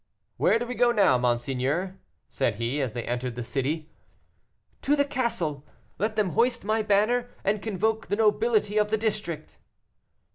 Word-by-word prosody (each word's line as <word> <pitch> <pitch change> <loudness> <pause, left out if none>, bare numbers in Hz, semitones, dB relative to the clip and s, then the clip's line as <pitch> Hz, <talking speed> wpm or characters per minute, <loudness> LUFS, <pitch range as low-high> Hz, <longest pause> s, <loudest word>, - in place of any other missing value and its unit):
"Where - - +4
do 240 - -3
we 245 - -4
go 240 +1 +3
now, 200 - +4
monseigneur?" 130 +9 -1 0.3
said - - -1
he, 120 +6 -2
as 130 -5 -2
they 120 - -4
entered 120 0 -3
the 120 - -4
city. 150 +6 -2 0.9
"To 290 - +2
the 285 -1 +2
castle. 230 - -2 0.4
Let 215 +3 0
them 210 -4 +1
hoist 240 +2 +1
my 215 +2 +1
banner 215 +4 +2
and 205 +1 0
convoke 220 +1 -1
the - - 0
nobility 215 0 +2
of 210 0 +2
the 220 - +1
district." 210 -7 -3
205 Hz, 160 wpm, -26 LUFS, 140-225 Hz, 0.9 s, Where